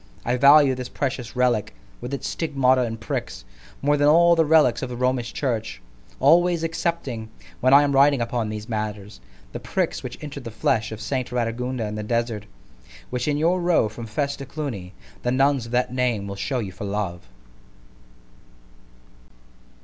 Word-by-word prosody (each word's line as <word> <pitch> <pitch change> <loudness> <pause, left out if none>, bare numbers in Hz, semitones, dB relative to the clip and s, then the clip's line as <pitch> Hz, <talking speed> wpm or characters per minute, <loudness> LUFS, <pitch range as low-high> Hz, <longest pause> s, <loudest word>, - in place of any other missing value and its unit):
I 120 - +1
value 140 +1 +6
this 125 -1 -6
precious 125 -3 -4
relick, 120 -4 +1 0.3
with 120 +2 -6
its 140 - -3
stigmata 135 -5 +1
and 115 -2 -3
pricks, 110 - -5 0.4
more 145 +1 +3
than 145 0 +3
all 170 +3 +6
the 165 - +4
relicks 150 -7 +4
of 130 - -4
the 125 - -5
Romish 125 -1 0
church——always 110 - 0
excepting, 160 -9 -3 0.3
when 130 - +3
I 140 +1 +8
am 145 - +1
writing 140 0 +4
upon 115 -1 -2
these 105 0 -6
matters, 105 - -5 0.3
the - - -6
pricks - - -2
which - - -7
entered 140 -2 -7
the 115 - -6
flesh 110 0 0
of 110 - -6
St. 130 +1 -3
Radagunda 125 0 -2
in 105 - -4
the 105 - -4
desert, 115 -1 -2 0.6
which 125 +1 -2
in 145 -1 +1
your 175 +4 +2
road 170 -10 +2
from 115 +1 -8
FESSE 140 +6 -2
to 140 - -7
CLUNY, 115 -12 -6 0.3
the 125 - -1
nuns 135 -1 +2
of - - -11
that 125 +1 +1
name 125 -5 0
will 100 0 -6
shew 125 +5 -2
you 100 -4 -5
for 100 +2 -7
love. 100 -4 -3
125 Hz, 170 wpm, -23 LUFS, 110-140 Hz, 0.6 s, I